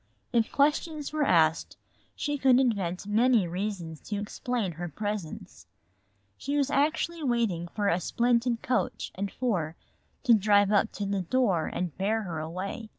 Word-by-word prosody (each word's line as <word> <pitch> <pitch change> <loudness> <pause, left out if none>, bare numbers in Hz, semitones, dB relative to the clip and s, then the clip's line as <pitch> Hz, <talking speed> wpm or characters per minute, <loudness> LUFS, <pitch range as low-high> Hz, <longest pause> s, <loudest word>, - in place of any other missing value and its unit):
If 230 -2 +2
questions 300 +1 0
were 310 - -1
asked 165 - +2 0.4
she 290 0 -2
could 260 -1 +5
invent 200 -8 0
many 220 -1 +3
reasons 175 -3 -4
to 205 -1 -2
explain 210 0 -3
her 175 +2 -6
presence. 205 0 -6 0.7
She 285 +2 -2
was 285 -1 +1
actually 310 +4 0
waiting 230 - 0
for 205 +3 -2
a 180 -2 +2
splendid 235 +4 +1
coach 255 -2 -1
and 200 +1 -4
four 180 -11 -1 0.5
to 245 -5 +5
drive 205 -1 +4
up 210 +1 +3
to 205 - -3
the 200 -1 -1
door 190 -4 +1
and 175 -3 -3
bear 215 +3 0
her 170 -5 -4
away. 185 +7 -5
210 Hz, 150 wpm, -28 LUFS, 180-250 Hz, 0.7 s, could